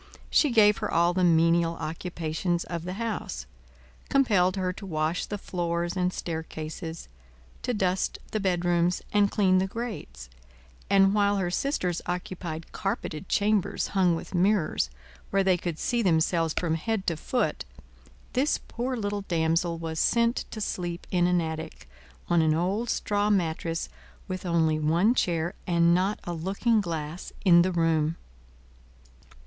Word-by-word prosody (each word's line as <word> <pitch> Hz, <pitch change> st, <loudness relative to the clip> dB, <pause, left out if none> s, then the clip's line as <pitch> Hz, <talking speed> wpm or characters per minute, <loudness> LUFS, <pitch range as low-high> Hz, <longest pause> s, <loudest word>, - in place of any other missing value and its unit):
She 295 Hz, -, +4 dB
gave 210 Hz, -4 st, +5 dB
her -, -, -2 dB
all 170 Hz, +1 st, +3 dB
the 185 Hz, 0 st, +1 dB
menial 165 Hz, 0 st, +4 dB
occupations 170 Hz, +1 st, -3 dB
of 170 Hz, -1 st, -5 dB
the 180 Hz, -, -4 dB
house; 200 Hz, -, -4 dB, 0.6 s
compelled 205 Hz, -9 st, +3 dB
her 185 Hz, -1 st, -1 dB
to 200 Hz, -, -9 dB
wash 155 Hz, 0 st, -1 dB
the 205 Hz, -, -4 dB
floors 175 Hz, -2 st, -2 dB
and 180 Hz, -1 st, +1 dB
staircases; 160 Hz, 0 st, -6 dB, 0.5 s
to -, -, -1 dB
dust 190 Hz, -4 st, 0 dB
the 215 Hz, -, -1 dB
bedrooms, 175 Hz, -2 st, +1 dB
and 205 Hz, -1 st, +4 dB
clean 185 Hz, -3 st, +3 dB
the 190 Hz, -, 0 dB
grates; 195 Hz, -, -6 dB, 0.6 s
and 195 Hz, 0 st, +5 dB
while 205 Hz, -1 st, +3 dB
her 180 Hz, -2 st, -1 dB
sisters 180 Hz, -, -1 dB
occupied 175 Hz, -2 st, -5 dB
carpeted 195 Hz, -4 st, -4 dB
chambers 205 Hz, -1 st, +1 dB
hung 185 Hz, -3 st, +3 dB
with 165 Hz, -, -7 dB
mirrors, 185 Hz, -1 st, +2 dB, 0.4 s
where 195 Hz, 0 st, +2 dB
they 190 Hz, -1 st, +4 dB
could 170 Hz, -2 st, -4 dB
see 240 Hz, +6 st, 0 dB
themselves 165 Hz, -3 st, +2 dB
from 170 Hz, -3 st, +1 dB
head 200 Hz, +5 st, -2 dB
to 170 Hz, -, 0 dB
foot, 155 Hz, -, -1 dB, 0.7 s
this 275 Hz, +4 st, +2 dB
poor 250 Hz, +2 st, -3 dB
little 205 Hz, -2 st, -2 dB
damsel 165 Hz, 0 st, +1 dB
was 160 Hz, -1 st, -4 dB
sent 235 Hz, +1 st, +2 dB
to 220 Hz, -, -7 dB
sleep 175 Hz, -4 st, -3 dB
in 175 Hz, -1 st, +3 dB
an 180 Hz, 0 st, +3 dB
attic, 160 Hz, -, -5 dB, 0.4 s
on 170 Hz, -1 st, +3 dB
an 155 Hz, -1 st, +3 dB
old 195 Hz, +8 st, -1 dB
straw 205 Hz, 0 st, 0 dB
mattress, 165 Hz, -4 st, 0 dB, 0.4 s
with 185 Hz, -1 st, -4 dB
only 160 Hz, -2 st, +2 dB
one 170 Hz, +9 st, +3 dB
chair 170 Hz, -7 st, 0 dB
and 170 Hz, -1 st, +4 dB
not 190 Hz, +4 st, +1 dB
a 175 Hz, -, -4 dB
looking 200 Hz, +7 st, +1 dB
glass 165 Hz, -2 st, -5 dB
in 175 Hz, -2 st, +7 dB
the 185 Hz, +2 st, +1 dB
room. 165 Hz, -2 st, +1 dB
175 Hz, 150 wpm, -27 LUFS, 165-200 Hz, 0.7 s, in